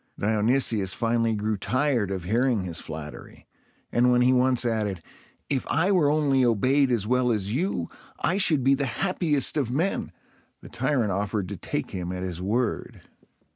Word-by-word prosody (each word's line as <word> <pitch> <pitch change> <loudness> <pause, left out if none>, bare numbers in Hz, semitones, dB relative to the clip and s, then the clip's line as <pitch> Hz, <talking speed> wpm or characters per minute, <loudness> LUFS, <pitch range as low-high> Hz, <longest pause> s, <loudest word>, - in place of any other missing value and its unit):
Dionysius 110 -2 +1
finally 115 -1 0
grew 105 0 -2
tired 130 -1 0
of 95 -3 -4
hearing 115 +2 +1
his 85 -2 -3
flattery; 75 -1 -9 0.5
and 125 +1 +3
when 125 0 +3
he 125 +1 +4
once 125 -1 +2
added, 105 -7 -2 0.4
"If 135 -3 -1
I 165 +6 +2
were 170 -7 +3
only 145 -3 +2
obeyed 130 +4 +2
as 115 -5 0
well 125 +1 +1
as 105 -2 -1
you, 135 - -1 0.3
I 185 - +1
should 155 -9 +3
be 135 +2 +4
the 140 0 0
happiest 160 -4 0
of 135 -6 0
men," 160 +10 -1 0.5
the - - -13
tyrant 130 -5 0
offered 100 0 -2
to 100 - -5
take 85 - -4
him 90 -1 -4
at 90 0 -5
his 90 -2 -4
word. 110 +4 -2
120 Hz, 170 wpm, -25 LUFS, 100-135 Hz, 0.5 s, he